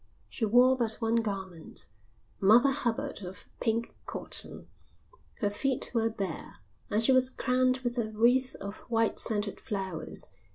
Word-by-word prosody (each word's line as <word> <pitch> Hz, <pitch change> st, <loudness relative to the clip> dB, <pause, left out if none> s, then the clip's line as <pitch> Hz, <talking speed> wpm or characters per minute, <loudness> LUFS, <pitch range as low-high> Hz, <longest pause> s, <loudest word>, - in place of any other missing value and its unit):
She 230 Hz, -, -2 dB
wore 245 Hz, +4 st, +5 dB
but 235 Hz, -3 st, 0 dB
one 225 Hz, 0 st, 0 dB
garment, 190 Hz, -7 st, -4 dB, 0.6 s
a -, -, -2 dB
Mother 235 Hz, +7 st, +6 dB
Hubbard 235 Hz, -6 st, -2 dB
of 185 Hz, +1 st, -9 dB
pink 230 Hz, 0 st, -1 dB
cotton, -, -, +1 dB, 0.7 s
her 205 Hz, -, +2 dB
feet 260 Hz, +5 st, +1 dB
were 225 Hz, -1 st, +1 dB
bare, 195 Hz, -6 st, -5 dB, 0.3 s
and 215 Hz, +2 st, +1 dB
she 265 Hz, -, +5 dB
was 255 Hz, 0 st, +4 dB
crowned 255 Hz, 0 st, +1 dB
with 245 Hz, 0 st, -1 dB
a 220 Hz, -2 st, -1 dB
wreath 245 Hz, +4 st, +2 dB
of 200 Hz, +1 st, -7 dB
white 225 Hz, -1 st, +1 dB
scented 205 Hz, -2 st, -2 dB
flowers. 190 Hz, -7 st, 0 dB
225 Hz, 150 wpm, -29 LUFS, 205-250 Hz, 0.7 s, Mother